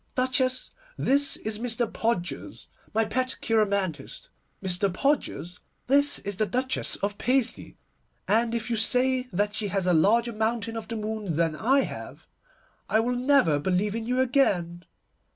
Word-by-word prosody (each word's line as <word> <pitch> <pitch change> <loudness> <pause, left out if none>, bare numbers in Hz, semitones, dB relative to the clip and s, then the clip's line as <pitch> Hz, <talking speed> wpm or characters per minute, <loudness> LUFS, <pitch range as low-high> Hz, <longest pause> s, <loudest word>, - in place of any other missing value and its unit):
Duchess, 255 0 +1 0.3
this 280 +1 +2
is 215 -1 -5
Mr. 240 0 0
Podgers, 220 -6 -3 0.3
my 225 +1 +1
pet 255 +3 -2
cheiromantist. 200 -9 -1 0.3
Mr. 190 +1 0
Podgers, 185 - -1 0.3
this 285 +2 +4
is 200 -1 -5
the 215 - +1
Duchess 260 +2 -1
of 205 0 -2
Paisley, 255 0 -1 0.5
and 230 +2 +2
if 230 0 -3
you - - +2
say 250 +3 +2
that 205 +3 0
she 215 -1 -2
has 195 -1 -1
a 180 - +3
larger 230 +8 +3
mountain 225 +1 -1
of 225 - -5
the 230 - -5
moon 215 -5 -3
than 165 -1 +1
I 265 - +3
have, - - -7 0.6
I 220 - +3
will 240 +2 0
never 245 - +3
believe 190 +6 0
in 225 0 -4
you 250 +1 0
again. 185 -10 +1
225 Hz, 150 wpm, -26 LUFS, 200-255 Hz, 0.6 s, this